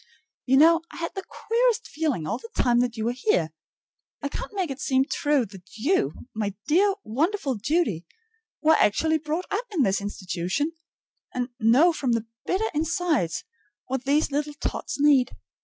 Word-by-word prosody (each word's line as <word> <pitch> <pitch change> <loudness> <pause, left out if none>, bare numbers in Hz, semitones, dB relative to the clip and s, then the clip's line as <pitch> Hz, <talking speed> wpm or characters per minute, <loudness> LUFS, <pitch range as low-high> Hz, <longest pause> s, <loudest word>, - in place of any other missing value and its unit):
You 265 +1 +5
know, 330 +3 +6
I - - -10
had 335 0 -4
the 385 - -4
queerest 470 0 0
feeling 290 - -1
all 155 - -2
the 460 - -11
time 240 -1 +3
that 245 -2 0
you 220 - -2
were 235 - +2
here. 180 - +1 0.7
I 285 - -1
can't - - -6
make 365 -7 -1
it 270 +2 -6
seem 265 0 +2
true 290 -3 +1
that 190 -1 -14
you, 230 - 0
my 205 -3 -2
dear, 385 +6 +3
wonderful 300 - 0
Judy, 225 - 0 0.6
were 315 +1 +6
actually 315 +7 +3
brought 315 +4 -3
up 445 +5 -1
in 350 -10 +1
this 195 -2 +1
institution, 195 - -2 0.6
and 250 0 -1
know 255 +10 +5
from 260 -6 0
the 230 -1 -1 0.2
bitter 425 +4 0
inside 315 - +1 0.6
what 265 0 -3
these 290 +2 +2
little 295 +1 -2
tots 285 - -4
need. 280 -3 +4
280 Hz, 170 wpm, -25 LUFS, 230-330 Hz, 0.7 s, know